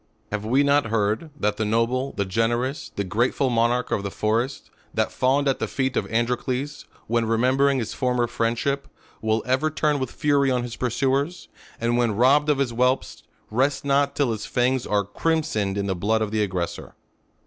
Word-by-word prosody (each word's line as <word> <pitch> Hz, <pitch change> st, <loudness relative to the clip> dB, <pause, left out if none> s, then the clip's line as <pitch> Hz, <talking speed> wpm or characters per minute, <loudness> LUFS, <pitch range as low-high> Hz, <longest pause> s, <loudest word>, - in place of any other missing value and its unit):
Have 105 Hz, 0 st, -2 dB
we 130 Hz, +6 st, +3 dB
not 140 Hz, -2 st, +3 dB
heard, 110 Hz, +7 st, 0 dB
that 105 Hz, 0 st, 0 dB
the 110 Hz, -, 0 dB
noble, 115 Hz, +5 st, 0 dB
the 100 Hz, -, -1 dB
generous, 120 Hz, +7 st, -1 dB
the 100 Hz, -, -1 dB
grateful 120 Hz, +7 st, 0 dB
monarch 120 Hz, +1 st, +1 dB
of -, -, +1 dB
the 100 Hz, -, -3 dB
forest, 115 Hz, +7 st, -1 dB, 0.2 s
that -, -, +1 dB
fawned 140 Hz, +3 st, +1 dB
at 135 Hz, -, +1 dB
the -, -, -1 dB
feet 135 Hz, -1 st, -1 dB
of -, -, -2 dB
Androcles, 125 Hz, +4 st, -1 dB, 0.2 s
when 115 Hz, 0 st, 0 dB
remembering 130 Hz, +5 st, +3 dB
his 115 Hz, -4 st, -3 dB
former 125 Hz, -2 st, +1 dB
friend 115 Hz, 0 st, -1 dB
ship, 140 Hz, +2 st, -1 dB, 0.3 s
will 110 Hz, 0 st, 0 dB
ever 130 Hz, +5 st, +1 dB
turn 150 Hz, -1 st, 0 dB
with 130 Hz, -2 st, -2 dB
fury 140 Hz, -2 st, +2 dB
on 125 Hz, -2 st, +1 dB
his 120 Hz, -1 st, -6 dB
pursuers; 135 Hz, +7 st, -1 dB, 0.3 s
and 120 Hz, +1 st, +1 dB
when 115 Hz, -4 st, +1 dB
robbed 140 Hz, +6 st, +4 dB
of 150 Hz, -, +3 dB
his 135 Hz, -3 st, 0 dB
whelps, 125 Hz, +3 st, 0 dB, 0.3 s
rests 135 Hz, +6 st, +1 dB
not 140 Hz, 0 st, +2 dB
till 140 Hz, -5 st, +1 dB
his 110 Hz, -1 st, -4 dB
fangs 125 Hz, +1 st, +1 dB
are 105 Hz, -1 st, +2 dB
crimsoned 105 Hz, -4 st, -1 dB
in 100 Hz, -, -1 dB
the 100 Hz, -, 0 dB
blood 110 Hz, +5 st, +1 dB
of 105 Hz, -, -4 dB
the 110 Hz, -1 st, +1 dB
aggressor 90 Hz, -4 st, -3 dB
125 Hz, 190 wpm, -24 LUFS, 110-135 Hz, 0.3 s, robbed